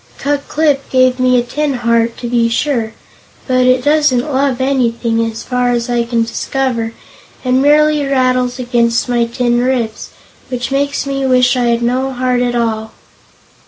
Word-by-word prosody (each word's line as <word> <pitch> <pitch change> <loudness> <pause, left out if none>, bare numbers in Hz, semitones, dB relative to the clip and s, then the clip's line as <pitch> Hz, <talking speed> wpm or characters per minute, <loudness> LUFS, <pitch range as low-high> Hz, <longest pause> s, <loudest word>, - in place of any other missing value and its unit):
Ku 285 +1 -1
Klip 295 -3 0
gave 255 0 +2
me 255 0 +3
a 240 - +2
tin 285 +3 -2
heart, 235 -1 0
to 240 - -5
be 235 -1 +1
sure, 230 -3 -1 0.5
but 255 -1 +2
it 255 0 +3
doesn't 295 -2 +2
love 270 -1 0
anything, 235 -3 0
as 225 0 -5
far 250 -1 0
as 240 0 -2
I 240 -1 0
can 230 -1 0
discover, 230 -1 -2 0.5
and 255 +1 +2
merely 300 +1 +3
rattles 255 -2 +1
against 240 -2 0
my 240 -1 +1
tin 240 +1 0
ribs, 245 -3 -2 0.4
which 250 0 -4
makes 280 +1 -1
me 275 -1 -2
wish 250 0 +3
I 250 -1 0
had 235 0 +1
no 255 +3 0
heart 250 0 0
at 245 -1 -1
all." 220 -2 -2
250 Hz, 165 wpm, -15 LUFS, 235-270 Hz, 0.5 s, me